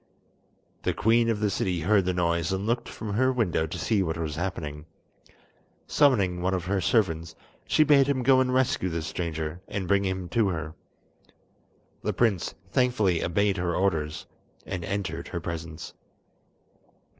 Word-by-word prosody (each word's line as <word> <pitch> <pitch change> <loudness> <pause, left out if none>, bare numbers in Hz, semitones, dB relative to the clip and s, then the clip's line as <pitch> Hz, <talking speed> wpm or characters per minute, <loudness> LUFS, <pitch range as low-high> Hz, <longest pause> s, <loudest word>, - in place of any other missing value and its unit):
The - - -1
queen 115 +2 +3
of 110 -2 0
the 105 -1 +1
city 90 -3 -1
heard 100 +2 +3
the 90 - +1
noise 85 -1 0
and 95 +1 -2
looked 120 +2 -1
from 105 -2 -6
her 130 +5 +3
window 100 -10 0
to - - -6
see 110 -3 +1
what 80 -3 -1
was 80 -2 -3
happening. 80 -4 -4 1.0
Summoning 100 -12 +3
one 95 +1 +1
of 90 -2 -3
her 95 +1 0
servants, 85 -5 +1 0.3
she 155 - +4
bade 140 -3 +5
him 135 -3 0
go 130 +1 +5
and 130 -1 +1
rescue 125 -7 +1
the 85 -1 -3
stranger, 80 0 -4
and 95 -3 -4
bring 100 +1 +3
him 95 -2 -2
to 110 +3 +2
her. 80 -3 -4 1.3
The - - -1
prince 110 -7 +1 0.2
thankfully 110 -10 +2
obeyed 100 +3 +1
her 90 -1 -1
orders, 80 -5 -1 0.4
and 90 -3 -4
entered 85 -3 -3
her 85 - -4
presence. 80 -1 -6
95 Hz, 160 wpm, -27 LUFS, 85-110 Hz, 1.3 s, bade